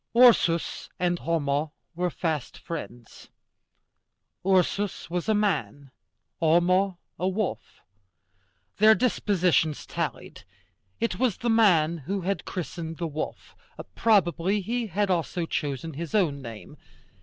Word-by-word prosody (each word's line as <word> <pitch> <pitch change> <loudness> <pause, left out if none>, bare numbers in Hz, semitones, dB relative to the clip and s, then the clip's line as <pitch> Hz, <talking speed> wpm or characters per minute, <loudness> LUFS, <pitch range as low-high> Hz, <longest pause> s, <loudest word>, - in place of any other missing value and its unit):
Ursus 220 -9 +4
and 175 -1 +1
Homo 150 -2 -1 0.2
were 180 +1 -1
fast 155 -5 -3
friends. 120 -8 -8 1.1
Ursus 190 0 +1
was 180 +4 -2
a 215 - +4
man, 155 -9 -1 0.5
Homo 180 +3 +3 0.2
a 185 - 0
wolf. 200 +1 -4 1.0
Their 215 +1 +7
dispositions 185 - +1
tallied. - - -5 0.6
It 230 - -1
was 250 -5 +1
the 235 0 0
man 170 -8 +4
who 190 +8 -3
had 195 +2 -2
christened 165 -3 -5
the 170 - -3
wolf: 155 -1 -5 0.4
probably 200 -2 +2
he 235 +4 -2
had 200 +1 0
also 175 0 -1
chosen 150 0 -3
his 165 +7 -5
own 155 -9 +1
name. 115 +4 -10
175 Hz, 115 wpm, -26 LUFS, 160-200 Hz, 1.1 s, Their